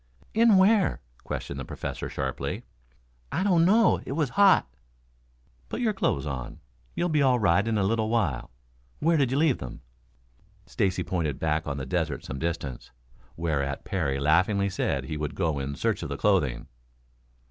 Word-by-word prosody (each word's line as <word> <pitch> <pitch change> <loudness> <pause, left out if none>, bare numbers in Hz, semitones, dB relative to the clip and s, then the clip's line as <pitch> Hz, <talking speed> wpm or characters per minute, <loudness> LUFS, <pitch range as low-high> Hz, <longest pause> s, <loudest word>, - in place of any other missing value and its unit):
"In 225 -2 +5
where?" 190 - +4 0.2
questioned 70 - -5
the - - -4
Professor - - -5
sharply. 65 -1 -3 0.7
"I 185 - 0
don't 180 -5 +4
know. 220 +5 +4
It - - -5
was 150 -3 0
hot." 200 - +5 1.0
"Put - - -4
your 225 -4 +1
clothes 75 - 0
on. 65 -4 -5 0.4
You'll 175 - 0
be 155 -3 +2
all 130 -2 +4
right 100 -1 +2
in 110 -1 +1
a 100 - +2
little 110 +2 +1
while. 95 - 0 0.5
Where 165 +2 +2
did 140 -5 +2
you 130 - 0
leave 150 -4 +3
them?" 65 - -8 0.8
Stacy 80 +10 -1
pointed 80 -7 -2
back 80 0 -1
on 70 -1 -3
the 70 - -4
desert 65 - -2
some 65 - -5
distance, 85 -6 -4 0.5
whereat 70 -5 -2
Parry 70 -8 -1
laughingly 95 +7 +2
said 70 -7 -1
he 75 +4 -5
would 75 -1 -4
go 80 -6 0
in 70 +1 -4
search - - -1
of - - -5
the - - -4
clothing. 80 -12 +1
95 Hz, 170 wpm, -27 LUFS, -, 1.0 s, In